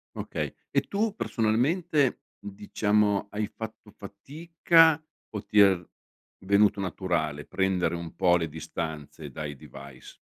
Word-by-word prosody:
Okay, - - -4 0.2
e - - +3
tu, 210 +1 -1
personalmente, 125 - +1 0.2
diciamo, 105 0 0
hai 105 0 -2
fatto 110 -1 -9
fatica 160 - +2 0.3
o 105 -2 -6
ti 105 - +2
è 100 -2 +7
v 85 - -15 0.6
venuto 100 +1 +4
naturale 85 -5 -2
prendere 95 -3 0
un 85 -1 -7
po' 90 -2 +4
le 80 -1 -2
distanze 80 -1 -6
dai 75 +1 -6
device? 70 -1 -13
100 Hz, 120 wpm, -27 LUFS, 85-115 Hz, 0.6 s, è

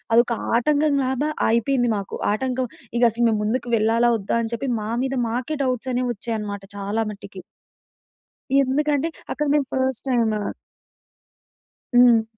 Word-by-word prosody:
అదొక 235 +1 +4 0.2
ఆటంకం 290 +3 +2
లాగా 265 +4 0 0.2
అయిపోయింది 240 +1 +2
మాకు. 200 -1 -5 0.2
ఆటంకం 255 +2 -1 0.3
ఇక 240 - +2
అసలు 235 +2 0
మేము 215 -2 +1
ముందుకు 245 +3 -1
వెళ్ళాలా 225 +1 +2 0.2
వద్దా, 200 +1 -2
అని 225 0 -4
చెప్పి 235 +4 -3
మా 210 - -4
మీద 270 0 -1
మాకే 245 +6 -2
డౌట్స్ 255 -1 -1
అనేవి 250 0 0
వచ్చాయి 230 +1 -4
అన్నమాట 200 -1 -5
చాలా 200 +3 -1
మట్టికి. 195 -2 -10 1.2
ఎందుకంటే 290 +3 +1 0.3
అక్కడ 300 - -2
మేము 290 -2 +2
ఫస్ట్ 260 -1 -1
టైమ్ 230 -3 +2 1.6
హ్మ్. 240 -2 +6
245 Hz, 140 wpm, -23 LUFS, 225-265 Hz, 1.6 s, హ్మ్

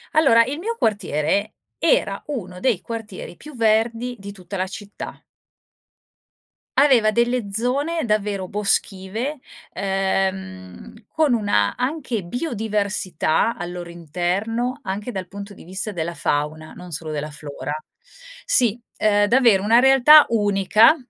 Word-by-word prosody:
Allora, 270 -7 +6
il 280 +6 -4
mio 460 +6 -3
quartiere 200 - 0 0.2
era - - +1
uno 185 -11 -5
dei 230 -6 +1
quartieri 220 -6 -7
più 300 -1 -11
verdi 230 +2 +1
di 200 +1 -8
tutta 195 0 -8
la 185 +1 -1
città. 200 +1 -8 1.6
Aveva 255 -6 +5
delle 235 -2 0
zone 280 +9 0
davvero 205 -3 -1
boschive, 210 +6 -1 0.3
ehm, 190 - -2 0.2
con 310 -4 +2
una, 205 - +1
anche 250 - -2
biodiversità 210 - -1
al 175 -1 -5
loro 175 -1 -7
interno, 185 - -2
anche 205 +5 -4
dal 190 -3 -5
punto 200 +2 -9
di - - -14
vista 190 +4 -3
della 170 -2 -3
fauna, 155 0 -2
non 180 -1 -11
solo 155 0 -5
della 150 0 -4
flora. 145 -1 -6 0.7
Sì, 245 - +3 0.2
ehm, 205 -1 +3
davvero 230 -5 +4
una 225 +3 +5
realtà 270 +4 +7
unica, 210 - +4
205 Hz, 125 wpm, -22 LUFS, 185-245 Hz, 1.6 s, realtà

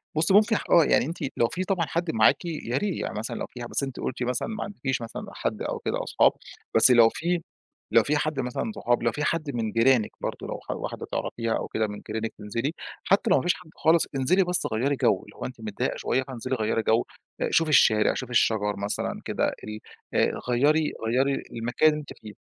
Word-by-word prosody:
بُصّي، 160 +4 +2
ممكن 215 +2 +5 0.2
آه، 170 - +7
يعني - - +3
أنتِ 165 +5 -5 0.2
لو 115 - +3
فيه 185 +7 -3
طبعًا 185 -3 0
حد 170 0 -2
معاكِ 110 +8 +3
يا 150 -7 -3
ري 205 -3 -1
يعني - - -3
مثلًا 110 - -4
لو - - -3
فيه 120 -1 -8
بس 120 - -2
أنتِ 135 -2 -5
قُلتِ 125 0 -3
مثلًا 125 0 -1
ما 220 -1 -4
عندكيش 135 -11 -3
مثلًا 115 0 -6
حد - - -3
أو - - -3
كده - - -2
أصحاب - - +4 0.4
بس 115 +3 +7
لو 115 -2 +7
فيه 175 +6 -1 0.5
لو - - +6
فيه 150 +1 +1
حد 150 -1 -1
مثلًا 125 - -2
أصحاب، 120 -7 +1
لو 115 - +2
فيه 150 - -3
حد 155 -3 -1
من 110 -2 -1
جيرانِك 115 0 +3
برضه - - -4
لو - - -5
ح - - -7
واحدة - - -5
تعرَفيها 115 -1 -2
أو - - -4
كده 110 -1 -1
من 105 0 -8
جيرانِك 110 +1 -3
تنزِلي، 115 +7 -3 0.3
حتى 200 +3 +2
لو 190 - +5
ما - - -1
فيش 175 +1 +3
حد 180 -3 -14
خالص، 165 +1 +3
انزِلي 135 +9 +3
بس 180 0 0
غيّري 135 +6 +1
جَو، - - +2
اللي - - -16
هو - - -6
أنتِ 125 -3 -8
متضايقة 110 +4 -2
شوية 130 - 0
فانزِلي 130 0 -4
غيّري 110 -1 0
جَو 110 +2 +2 0.4
آآ، - - +1
شوفي 165 -1 +3
الشارع، 110 -7 +5
شوفي 130 -2 -5
الشجر 105 -3 +2
مثلًا 100 +1 -3
كده، - - 0 0.2
ال 105 0 -6 0.3
آآ، - - +3 0.2
غيّري 150 +5 +2
غيّري 135 +4 +1
المكان 120 +7 +2
اللي 150 0 -1
أنتِ 145 - -10
فيه. 105 -1 -10
130 Hz, 220 wpm, -26 LUFS, 115-160 Hz, 0.5 s, آه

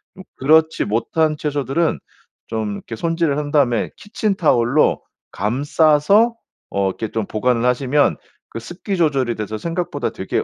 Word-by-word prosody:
좀 190 - -11
그렇지 160 +4 +3
못한 155 +8 0
채소들은 145 +2 -1 0.5
좀 110 -2 -3
이렇게 115 - -8
손질을 165 -2 0
한 145 -1 -3
다음에 130 -7 +2
키친타월로 160 - +1 0.3
감싸서 150 - +3 0.4
어 100 -1 0
이렇게 110 +3 -5
좀 110 -1 -2
보관을 115 +3 0
하시면 130 +3 +2 0.3
그 - - -6
습기 175 - -5
조절이 135 -8 +1
돼서 110 0 -4
생각보다 165 -6 -2
되게 95 -4 -2
145 Hz, 310 characters per minute, -20 LUFS, 115-160 Hz, 0.5 s, 그렇지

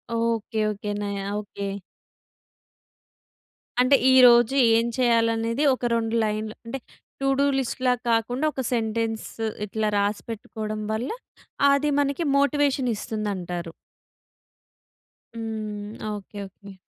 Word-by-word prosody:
Okay. 230 -1 -1
Okay. 205 0 -5
నా 205 - -2 0.3
okay. 200 -1 -6 2.1
అంటే 265 +2 +5 0.2
ఈరోజు 245 0 +7 0.2
ఏం 230 +1 +1
చేయాలనేది 230 +1 +2
ఒక 245 - -5
2 225 0 -1
లైన్‌లు 215 0 -2
అంటే 270 +4 -5 0.4
టూ 275 - +1
డూ 280 - +4
లిస్ట్‌లా 255 0 0 0.2
కాకుండా 245 +5 +1
ఒక 265 - -3
సెంటెన్స్ 225 -1 -1 0.4
ఇట్లా 215 +1 -1
రాసిపెట్టుకోవడం 215 +1 -3
వల్ల 230 +5 -2 0.6
అది 290 +1 +1
మనకి 285 +4 -1
మోటివేషన్ 280 -2 +2
ఇస్తుందంటారు. 180 -6 -4 1.6
హ్మ్. 215 -2 -5 0.2
ఓకే. 205 0 -8
ఓకే. 200 +1 -14
225 Hz, 100 wpm, -25 LUFS, 210-250 Hz, 2.1 s, ఈరోజు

